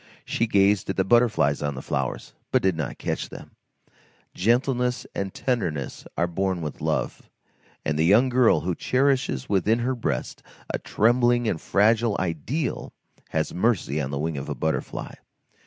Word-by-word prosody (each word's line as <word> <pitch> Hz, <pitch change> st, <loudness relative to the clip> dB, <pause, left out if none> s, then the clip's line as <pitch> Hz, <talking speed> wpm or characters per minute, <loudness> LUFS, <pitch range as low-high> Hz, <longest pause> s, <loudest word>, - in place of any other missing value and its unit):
She 115 Hz, -, 0 dB
gazed 100 Hz, -2 st, +3 dB
at 95 Hz, -, -2 dB
the 95 Hz, -, +3 dB
butterflies 110 Hz, -, +3 dB
on 70 Hz, -1 st, -2 dB
the 65 Hz, -, -6 dB
flowers, 65 Hz, -2 st, -3 dB, 0.2 s
but -, -, +2 dB
did 95 Hz, -2 st, +2 dB
not 80 Hz, -4 st, -4 dB
catch -, -, -3 dB
them; -, -, -11 dB, 0.8 s
gentleness 125 Hz, +4 st, +1 dB
and 100 Hz, -1 st, -3 dB
tenderness 90 Hz, -, -2 dB
are 85 Hz, -, +2 dB
born 90 Hz, 0 st, -1 dB
with 75 Hz, -, -6 dB
love, -, -, -2 dB, 0.6 s
and 75 Hz, +1 st, 0 dB
the -, -, +4 dB
young 110 Hz, +9 st, +5 dB
girl 125 Hz, -2 st, +4 dB
who 90 Hz, +1 st, -1 dB
cherishes 130 Hz, -, +1 dB
within 105 Hz, +3 st, +2 dB
her 125 Hz, +2 st, 0 dB
breast 80 Hz, -, -3 dB, 0.3 s
a -, -, -1 dB
trembling 120 Hz, +1 st, +2 dB
and 80 Hz, -, -1 dB
fragile 110 Hz, +2 st, +2 dB
ideal 95 Hz, -, -2 dB, 0.4 s
has 80 Hz, -1 st, -1 dB
mercy 90 Hz, -, +1 dB
on 65 Hz, -, -3 dB
the 70 Hz, -, -3 dB
wing 75 Hz, 0 st, -2 dB
of -, -, -7 dB
a -, -, -2 dB
butterfly. 80 Hz, 0 st, -3 dB
100 Hz, 160 wpm, -25 LUFS, 80-120 Hz, 0.8 s, young